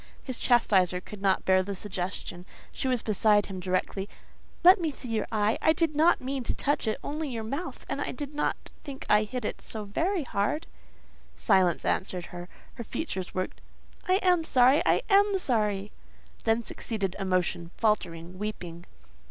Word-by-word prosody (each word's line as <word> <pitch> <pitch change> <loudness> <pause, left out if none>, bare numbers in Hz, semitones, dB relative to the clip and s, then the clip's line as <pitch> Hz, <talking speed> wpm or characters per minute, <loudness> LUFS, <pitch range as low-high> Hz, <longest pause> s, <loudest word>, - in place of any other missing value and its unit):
His 255 -3 -5
chastiser 190 -7 +3
could 200 +2 -11
not 195 -1 +2
bear 185 0 +5
the 200 +1 -4
suggestion. 185 -2 -5 0.3
She - - -3
was 250 -3 +1
beside 210 -1 +3
him 190 -2 -6
directly. 185 +2 -2 0.5
"Let 365 +1 +8
me 325 - +1
see 260 -3 -8
your 220 -2 -1
eye: 215 0 +1
I 315 - +4
did 320 -1 0
not 320 +3 +4
mean 265 +1 -3
to - - -1
touch 285 -4 0
it, 215 - 0
only 300 0 -3
your 230 -3 -4
mouth; 280 +11 -5
and - - -3
I - - -2
did 290 -1 -6
not 295 - -2
think 280 -3 -8
I 210 +1 +5
hit 245 0 -4
so 215 -1 -3
very 335 - 0
hard." 225 +6 -1 0.7
Silence 185 -3 +2
answered 180 -2 -1
her. 175 0 -7 0.2
Her 235 - -6
features 190 - -4
worked,—"I 185 - -5
am 360 -3 +4
sorry; 260 -1 +5
I - - +3
am 405 0 +4
sorry!" 210 - 0 0.5
Then 225 +1 +2
succeeded 205 -5 -3
emotion, 180 -3 0
faltering; 180 -5 -1
weeping. 175 -5 -6
215 Hz, 165 wpm, -28 LUFS, 190-280 Hz, 0.7 s, Let